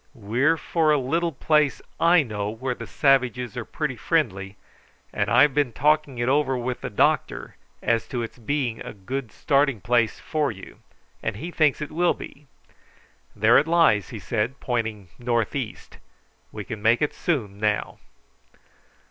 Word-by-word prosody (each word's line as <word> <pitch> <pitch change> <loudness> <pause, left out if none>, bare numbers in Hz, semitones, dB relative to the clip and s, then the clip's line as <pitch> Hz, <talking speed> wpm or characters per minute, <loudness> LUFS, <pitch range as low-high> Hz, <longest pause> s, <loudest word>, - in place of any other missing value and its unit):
"We're 125 +9 +1
for 160 -1 0
a 150 - +4
little 165 +6 0
place 150 -2 +2 0.2
I 165 0 +5
know, 105 -4 -3
where 125 +4 -3
the - - -9
savages 125 -5 +1
are - - -3
pretty - - -3
friendly, 95 +1 -1 0.6
and - - 0
I've 145 -2 +5
been 145 -3 +1
talking 150 +1 +1
it 120 0 -1
over 135 -1 +2
with 125 0 -3
the - - -4
doctor - - 0 0.3
as 115 -1 +1
to 120 -2 -3
its 115 - -8
being 120 -1 -2
a - - -7
good 120 +4 -5
starting 140 -4 +1
place 120 +1 +1
for 150 -4 -1
you, 95 -3 -12 0.4
and 110 - -2
he 165 +11 -6
thinks 155 -3 +2
it 150 - -7
will 175 +3 +2
be. 145 0 -11 0.9
There 110 +3 +5
it 150 - -1
lies," 165 - +3
he 115 - -7
said, 115 +5 -2
pointing 110 -6 -3
north 120 -1 0
east. 125 -6 -6 0.5
"We 105 - -6
can 110 +1 -6
soon - - -15
make 115 +5 +3
it 150 - -1 0.5
now." 105 -1 -1
125 Hz, 165 wpm, -24 LUFS, 110-150 Hz, 0.9 s, I